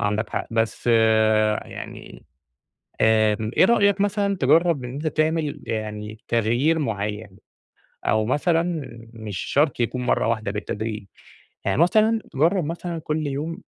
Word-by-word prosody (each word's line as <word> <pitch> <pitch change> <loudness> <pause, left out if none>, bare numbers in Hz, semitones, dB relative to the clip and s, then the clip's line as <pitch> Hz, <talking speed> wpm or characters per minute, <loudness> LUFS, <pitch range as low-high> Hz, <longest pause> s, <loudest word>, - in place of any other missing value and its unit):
عندك 105 0 -1
حق، - - -3
بس 115 0 -1
يعني، 110 -2 +1 0.8
آآ، 110 -1 +4 0.2
إيه - - +6
رأيك 200 -2 +3
مثلًا 200 -1 +1
تجرّب 165 -6 +3
إن 125 - -6
أنتَ 150 +3 -4
تعمل 155 -1 0
يعني 105 -1 -5
تغيير 120 +8 +2
معيَّن؟ 105 -5 -3 0.7
أو 110 0 +2
مثلًا 165 +6 +2 0.5
مش 105 -5 -6
شرط 145 - +1
يكون 125 +2 -1
مرَّة - - +1
واحدة، 110 -3 -1
بالتدريج 105 0 -4 0.6
يعني، - - 0
مثلًا 220 +5 +3
تجرّب 165 +6 +2
مثلًا 170 +2 -4
كل 155 -1 -2
يوم 150 +4 -4
125 Hz, 125 wpm, -23 LUFS, 110-165 Hz, 0.8 s, إيه